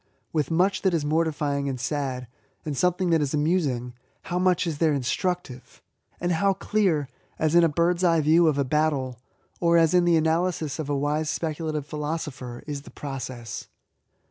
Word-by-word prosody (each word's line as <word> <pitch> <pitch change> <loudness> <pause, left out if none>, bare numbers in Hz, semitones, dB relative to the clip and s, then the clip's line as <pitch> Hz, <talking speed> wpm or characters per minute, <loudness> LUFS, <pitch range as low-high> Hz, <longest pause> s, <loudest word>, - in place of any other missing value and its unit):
With 150 -4 0
much 185 +4 +2
that 190 -3 +2
is 155 -3 -1
mortifying 145 -3 0
and 130 -2 -4
sad, 130 -1 -2 0.4
and 150 -2 -3
something 180 +3 +1
that 165 -2 +4
is 145 0 0
amusing, 145 -6 0 0.3
how 180 - -2
much 180 -1 +2
is 160 -4 -3
there 160 -2 +3
instructive! 140 +1 -3 0.4
And 175 +1 -1
how 195 +4 +2
clear, 190 -7 +1 0.3
as 155 0 +1
in 175 0 +6
a 165 - +4
bird's 170 +4 +1
eye 165 -2 +4
view 160 +3 +5
of 150 -3 +2
a 140 - +2
battle, 135 -4 0 0.4
or 170 -1 +4
as 165 0 +4
in 180 -1 +4
the 170 -1 +4
analysis 160 -2 0
of 150 -2 -4
a 145 - +1
wise 150 +2 0
speculative 155 -2 -2
philosopher, 150 -5 -5
is 145 -2 -4
the - - -13
process 130 -5 -6
155 Hz, 175 wpm, -25 LUFS, 140-170 Hz, 0.4 s, in